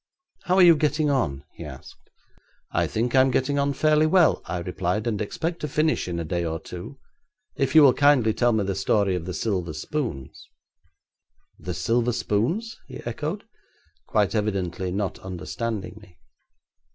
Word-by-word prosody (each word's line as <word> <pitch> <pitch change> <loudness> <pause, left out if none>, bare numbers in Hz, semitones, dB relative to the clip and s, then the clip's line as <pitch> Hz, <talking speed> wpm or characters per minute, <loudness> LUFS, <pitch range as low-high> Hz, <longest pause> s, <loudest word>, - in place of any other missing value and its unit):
'How 180 - +2
are 190 - +6
you 170 -2 +8
getting 150 0 +1
on?' 70 - -1
he - - -9
asked. - - -12 0.6
'I - - +1
think 120 +2 -1
I'm 130 0 +5
getting 130 +3 0
on 140 0 +1
fairly 155 +2 +3
well,' 175 0 +4
I 90 - -3
replied, 90 +4 -2
'and 110 -3 -1
expect 165 - -3
to 150 - -3
finish 155 -2 0
in 85 -1 -3
a - - -2
day 85 +2 -2
or 80 -1 -3
two, 90 - -9 0.6
if 135 0 -1
you 155 - +9
will 135 -3 +7
kindly 140 -7 +4
tell 120 +1 +2
me 110 -2 +1
the 100 0 -1
story 95 +1 +1
of 90 -2 -3
the 90 - -4
silver 90 -7 -2
spoons.' 80 - -5 1.1
'The - - -5
silver 120 +1 +1
spoons?' 130 - -1
he - - -8
echoed, 150 - -4 0.6
quite 105 -3 +1
evidently 95 -4 -2
not 100 +1 -2
understanding 100 +3 -5
me. 90 -5 -19
115 Hz, 165 wpm, -24 LUFS, 95-145 Hz, 1.1 s, you